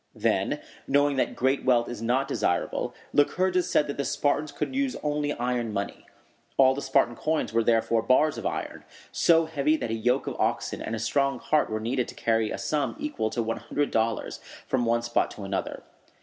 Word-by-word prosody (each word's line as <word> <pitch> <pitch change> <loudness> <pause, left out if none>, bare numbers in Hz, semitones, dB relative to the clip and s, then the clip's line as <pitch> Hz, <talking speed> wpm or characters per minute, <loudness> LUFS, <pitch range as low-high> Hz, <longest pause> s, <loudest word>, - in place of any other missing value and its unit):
Then, - - 0 0.3
knowing 145 0 +3
that - - 0
great 135 +2 +1
wealth 120 -2 +3
is 120 -3 -6
not 125 +4 +1
desirable, 140 - -1 0.2
Lycurgus 180 +5 +2
said 150 - +3
that 140 - -5
the 140 - 0
Spartans 145 +2 0
should 265 - -2
use 275 -1 0
only 145 0 0
iron 120 -2 -1
money. 100 -1 -4 0.5
All 130 -1 +6
the 140 - -4
Spartan 135 -3 +2
coins 155 -4 -1
were 115 0 +3
therefore 115 0 +2
bars 130 +6 +3
of - - -8
iron, - - -4 0.3
so 165 -1 +4
heavy 155 -1 +1
that 115 - -3
a - - 0
yoke 125 +4 +1
of - - -4
oxen - - -1
and 115 - -3
a - - -4
strong 140 +4 0
cart 155 -4 +1
were 110 0 -2
needed 120 +3 -1
to - - -9
carry 115 -1 +1
a - - -3
sum 150 -2 -1
equal 295 - -2
to 120 +1 -2
one 115 +1 -2
hundred 145 0 -2
dollars 115 0 -1 0.3
from 125 -2 0
one 115 0 +1
spot 120 0 +1
to 105 - -9
another. 95 0 -3
130 Hz, 200 wpm, -27 LUFS, 115-145 Hz, 0.5 s, All